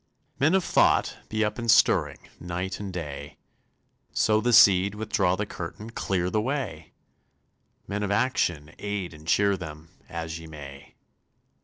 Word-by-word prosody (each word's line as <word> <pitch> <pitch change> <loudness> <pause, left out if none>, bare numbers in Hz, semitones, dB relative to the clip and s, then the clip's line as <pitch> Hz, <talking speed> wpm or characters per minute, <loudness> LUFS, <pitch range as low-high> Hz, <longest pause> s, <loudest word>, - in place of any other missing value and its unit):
Men 155 +7 +4
of 190 - +2
thought! - - +3
be 110 0 +1
up 105 +2 -3
and 115 0 -3
stirring, 110 - +3
Night 90 +2 -4
and 100 -2 -5
day; 75 -5 -7 0.8
Sow 110 0 +2
the 120 - +1
seed, 100 -2 +6
withdraw 105 -4 +1
the 105 +3 -2
curtain, 105 +4 -7
Clear 90 -5 -1
the 110 - +1
way! 110 - -4 0.9
Men 105 +1 -3
of 105 - -1
action, 90 - 0
aid 100 -4 -4
and 75 +1 -14
cheer 100 +2 +3
them, 80 -3 -9 0.2
As 80 -1 -5
ye 80 - -11
may! 70 -3 -11
95 Hz, 150 wpm, -26 LUFS, 80-105 Hz, 0.9 s, seed